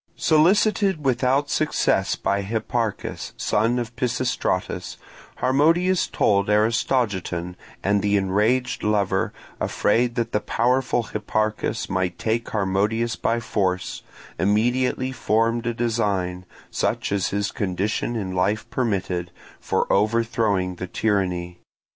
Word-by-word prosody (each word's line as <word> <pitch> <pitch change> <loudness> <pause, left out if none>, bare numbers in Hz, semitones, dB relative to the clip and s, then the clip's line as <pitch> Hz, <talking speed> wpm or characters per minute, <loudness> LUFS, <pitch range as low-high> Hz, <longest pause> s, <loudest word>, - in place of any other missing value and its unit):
Solicited 190 +1 +3
without 130 +2 +2
success 100 -10 +1
by 100 0 0
Hipparchus, 110 +1 -3
son 115 +4 +1
of 120 0 -4
Pisistratus, 125 -6 -1 0.4
Harmodius 165 +7 +3
told 100 -1 +2
Aristogiton, 105 -5 0 0.3
and 100 +1 +2
the 100 0 +2
enraged 110 +6 +1
lover, 105 -2 +1 0.3
afraid 120 +3 +1
that 115 -1 -1
the 105 - +1
powerful 125 +2 +1
Hipparchus 110 0 -2
might 95 -2 -1
take 115 +3 -1
Harmodius 105 +3 0
by 115 +1 0
force, 95 -5 -1 0.4
immediately 120 +5 +1
formed 115 -1 0
a 120 - 0
design, 100 -6 -1 0.2
such - - -1
as 100 -3 +1
his 100 +1 -1
condition 100 +4 -2
in 95 -4 -3
life 100 +4 0
permitted, 95 -7 -1 0.3
for - - 0
overthrowing 105 -4 +1
the 95 - -5
tyranny. 90 -4 -1
110 Hz, 110 wpm, -23 LUFS, 95-120 Hz, 0.4 s, Solicited